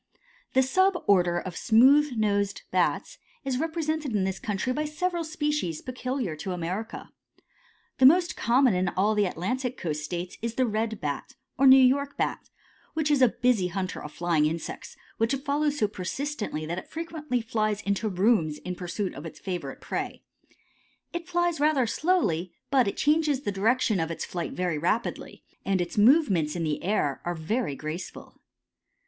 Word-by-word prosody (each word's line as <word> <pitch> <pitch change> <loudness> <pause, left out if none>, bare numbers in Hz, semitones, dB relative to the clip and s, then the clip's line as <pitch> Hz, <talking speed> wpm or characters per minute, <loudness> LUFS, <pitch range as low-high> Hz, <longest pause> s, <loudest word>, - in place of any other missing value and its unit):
The 265 - +5
sub 375 +8 +3
order 175 -3 +3
of 175 0 -5
smooth 265 +5 +5
nosed 205 -2 0
Bats - - 0 0.3
is 260 -2 -1
represented 315 -5 -2
in 200 - +2
this 190 0 -2
country 210 +4 -2
by 300 +3 -1
several 345 +3 -2
species 300 - -2
peculiar 255 - -3
to 185 +4 -4
America. 180 +6 -5 0.9
The 260 - +9
most 350 +4 +4
common 250 0 +3
in 185 +1 +1
all 200 +5 +1
the 210 -1 +2
Atlantic 250 +9 -3
coast 150 -3 -3
states 175 +3 -5
is 230 0 -3
the 260 - +2
Red 220 -1 -2
Bat, 145 -3 -4 0.2
or 275 - +4
New 265 0 +10
York 275 +2 +3
Bat, - - -2 0.5
which 310 -2 +1
is 285 -2 +3
a 255 - +8
busy 235 -6 +1
hunter 185 +1 -4
of 150 - -8
flying 165 -3 +1
insects, 165 +1 -6 0.2
which 225 +4 +2
it 270 +1 -9
follows 295 0 +1
so 215 - +2
persistently 210 - -4
that 170 +3 -3
it - - -14
frequently 315 -5 -3
flies 215 -2 -1
into 200 +2 0
rooms 185 -5 +2
in 180 - -5
pursuit 180 +2 -4
of 145 +5 -7
its - - -11
favorite 180 -2 -5
prey. - - -4 0.9
It 345 -1 -5
flies 345 -2 +1
rather 295 -4 +3
slowly, 220 - 0 0.2
but 260 -5 +4
it 200 - -3
changes 300 -2 +2
the 205 - -2
direction 215 +1 +2
of 165 0 -1
its 165 - -4
flight 175 -2 -4
very 180 -4 -1
rapidly, 180 +8 -2 0.2
and 195 -1 +1
its 175 -1 -3
movements 205 - +4
in 170 - -2
the 155 -2 -2
air 175 -9 0
are 175 0 -2
very 165 - -2
graceful. 155 +5 -7
220 Hz, 170 wpm, -27 LUFS, 180-280 Hz, 0.9 s, New